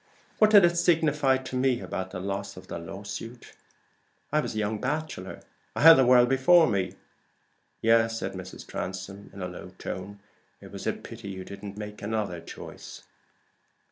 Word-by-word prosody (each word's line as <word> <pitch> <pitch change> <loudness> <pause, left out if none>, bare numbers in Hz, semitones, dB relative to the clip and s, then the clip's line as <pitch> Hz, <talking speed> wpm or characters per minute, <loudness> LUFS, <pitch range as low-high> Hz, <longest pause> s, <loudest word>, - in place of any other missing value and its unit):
What 215 - +6
did 205 -4 +8
it 170 0 +2
signify 150 -6 +3
to 130 0 -7
me 130 -1 +2
about 95 -5 -4
the 90 - -6
loss 100 +1 -4
of 90 - -10
the 85 - -6
lawsuit? 100 +7 -8 0.8
I 150 - +3
was 150 - -3
a - - -3
young 105 0 -1
bachelor 145 -8 -4 0.3
I - - -1
had 165 +1 +12
the 130 -5 +4
world 125 -1 +7
before 135 +7 +5
me." 100 -6 -1 0.9
"Yes," 115 0 +4
said 95 -3 -4
Mrs. 95 -1 -9
Transome, 95 +2 -6
in 95 - -8
a - - -2
low 90 0 -9
tone. 100 +2 -6 0.4
"It - - -13
was - - -6
a - - +2
pity 115 -3 -9
you 95 -1 -7
didn't 100 0 -9
make 105 0 -7
another 100 -5 -2
choice." - - -10
110 Hz, 170 wpm, -27 LUFS, 95-135 Hz, 0.9 s, had